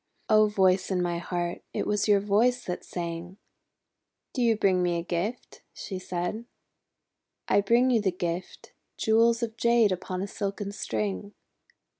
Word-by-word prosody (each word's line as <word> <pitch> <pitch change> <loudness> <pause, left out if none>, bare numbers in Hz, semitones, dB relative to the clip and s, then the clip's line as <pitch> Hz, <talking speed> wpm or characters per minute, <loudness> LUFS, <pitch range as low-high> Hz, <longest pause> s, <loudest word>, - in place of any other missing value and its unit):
:'O 215 -1 +6
Voice 190 -2 +2
in 190 -2 0
my 175 -1 -1
heart, 175 0 -3
it - - -1
was 210 0 0
your 205 -1 +5
voice 225 +5 +2
that 180 - -4
sang!' 170 +1 -6 1.0
'Do 255 - -2
you 230 -2 +3
bring 190 -3 +3
me 175 -1 +1
a 170 - -3
gift?" 185 +7 -4
she 190 -2 -6
said. 180 +5 -4 1.0
"I - - +4
bring 235 +5 +3
you 230 -3 +3
the 195 -2 +1
gift, 175 -1 -5 0.2
jewels 230 +1 +3
of 225 0 -4
Jade 235 -3 +4
upon 185 0 -3
a - - -3
silken 200 0 -4
string." 105 - -3
195 Hz, 155 wpm, -27 LUFS, 175-220 Hz, 1.0 s, O